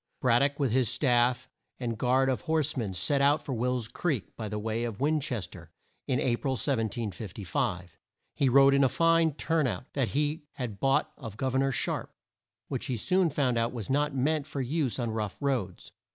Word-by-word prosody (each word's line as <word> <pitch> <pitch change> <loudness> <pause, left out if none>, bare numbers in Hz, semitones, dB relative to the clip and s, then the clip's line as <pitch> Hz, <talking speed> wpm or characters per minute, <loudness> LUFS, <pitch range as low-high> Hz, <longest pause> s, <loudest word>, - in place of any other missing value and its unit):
Brad 120 -2 +4
dock, 140 +2 +1
with 135 -5 +1
his 125 -2 +2
staff 125 -2 +2 0.3
and 120 -2 -2
a - - -7
guard 130 +4 +2
of 130 -2 0
horse 160 -3 0
men, 105 -8 -3
set 140 - +1
out 145 +2 +3
for 135 - -3
Will's 125 0 -1
Creek, 130 - -3
by 110 -2 -5
the 105 - -3
way 110 +2 -2
of 115 -4 -4
Win 155 +3 +2
ches 130 -9 -3
ter, - - -13 0.4
in 125 - +1
A 120 -2 +1
pril, 135 -1 -2
1755. 105 - -2 0.3
He 140 -3 +2
rode 135 +2 +6
in 140 0 +4
a 135 - +4
fine 165 0 +3
turn 160 -3 +1
out 120 +2 -5
that 135 -4 +1
he 150 0 -1
had 115 -6 -5
bought 135 +3 +2
of 115 -6 -8
Gov 130 +1 -1
er 130 - +2
nor 135 0 +2
Sharpe, - - -3 0.5
which - - -4
he 125 - -1
soon 180 - +2
found 130 -5 +1
out 115 +1 0
was 115 -1 -5
not 145 +1 +1
meant 145 +2 0
for 140 - -5
use 135 0 -1
on 120 -3 -2
rough 110 -3 -3
roads. 125 -11 -2
130 Hz, 210 wpm, -29 LUFS, 115-140 Hz, 0.5 s, rode